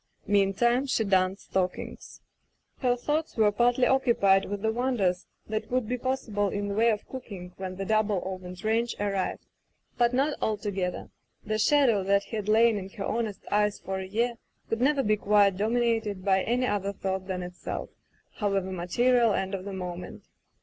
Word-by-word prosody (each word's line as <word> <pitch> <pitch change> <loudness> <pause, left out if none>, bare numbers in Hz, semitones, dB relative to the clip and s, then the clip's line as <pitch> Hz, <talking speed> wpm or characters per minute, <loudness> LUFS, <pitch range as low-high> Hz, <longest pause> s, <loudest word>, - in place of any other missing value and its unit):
Meantime 205 +6 +2
she 235 - +1
darned 190 -1 +2
stockings. 185 -2 -4 0.6
Her 250 -2 +2
thoughts 300 +5 -2
were 215 -2 +4
partly 245 +3 +3
occupied 215 -7 +3
with 205 +1 -5
the 220 - +2
wonders 220 -7 0 0.2
that 215 0 -3
would 255 -3 0
be 250 - -1
possible 225 -6 -1
in 205 +1 -3
the - - -2
way 225 +3 +3
of 215 -2 -1
cooking 195 -9 -8
when 185 -1 -5
the 195 +1 -4
double 215 -2 +2
ovened 185 -1 -7
range 230 +2 +1
arrived; 200 -2 -2 0.5
but 240 0 +4
not 275 +4 +1
altogether. 200 -4 -2 0.3
The 215 0 -1
shadow 235 -4 +4
that 200 +1 +3
had 215 -2 -4
lain 225 0 +4
in 190 0 -8
her 195 0 -6
honest 220 -3 -3
eyes 210 0 +2
for 190 0 -4
a 190 - -5
year 230 +4 -1 0.3
could 225 +1 0
never 275 +1 +3
be 215 0 +2
quite 200 -2 +3
dominated 220 -2 0
by 190 -1 +3
any 245 +4 0
other 200 -4 -1
thought 190 -1 -3
than 185 -2 -3
itself, 180 0 -6 0.5
however 195 -3 0
material 230 +5 +2
and 190 +1 -2
of 190 -1 -4
the 200 - -5
moment. 180 -1 -6
210 Hz, 170 wpm, -27 LUFS, 190-235 Hz, 0.6 s, were